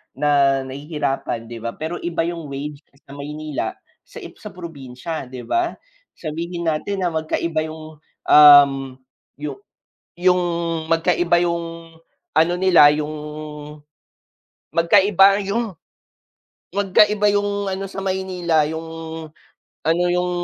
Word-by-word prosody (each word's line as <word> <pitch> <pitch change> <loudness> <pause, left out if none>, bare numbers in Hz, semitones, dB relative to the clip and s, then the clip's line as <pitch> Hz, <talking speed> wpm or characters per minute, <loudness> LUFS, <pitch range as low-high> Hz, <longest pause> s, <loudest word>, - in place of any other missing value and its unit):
na 140 -1 +3
nahihirapan 135 -4 -3
'di 115 -1 -8
ba? 115 - -2
Pero 160 +3 -3
iba 170 -1 -4
yung 170 -3 -5
wage 145 +2 -6 0.2
sa - - -13
Maynila 150 -3 -4 0.3
sa - - -12
i - - -9
sa - - -10
probinsya, 155 -3 -7
'di 125 -1 -8
ba? 350 0 +1 0.4
Sabihin 170 +2 -5
natin 190 +6 -1
na - - +2
magkaiba 160 0 -1
yung, 155 0 -10 0.3
um, 145 -2 +9 0.7
yu 145 -2 -5 0.7
yung 180 0 +4 0.5
magkaiba 175 +1 +2
yung 165 -1 -4 0.4
ano 165 +2 +4
nila 170 -6 +7
yung 150 0 -3 1.6
magkaiba 195 +3 +5
yung 210 -2 -2 1.0
magkaiba 205 +1 +3
yung 205 -1 -1
ano 195 +1 -3
sa - - -6
Maynila, 180 -5 0
yung 160 +1 -5 1.0
ano, 165 +3 +1
yung 180 0 0
165 Hz, 115 wpm, -21 LUFS, 150-180 Hz, 1.6 s, um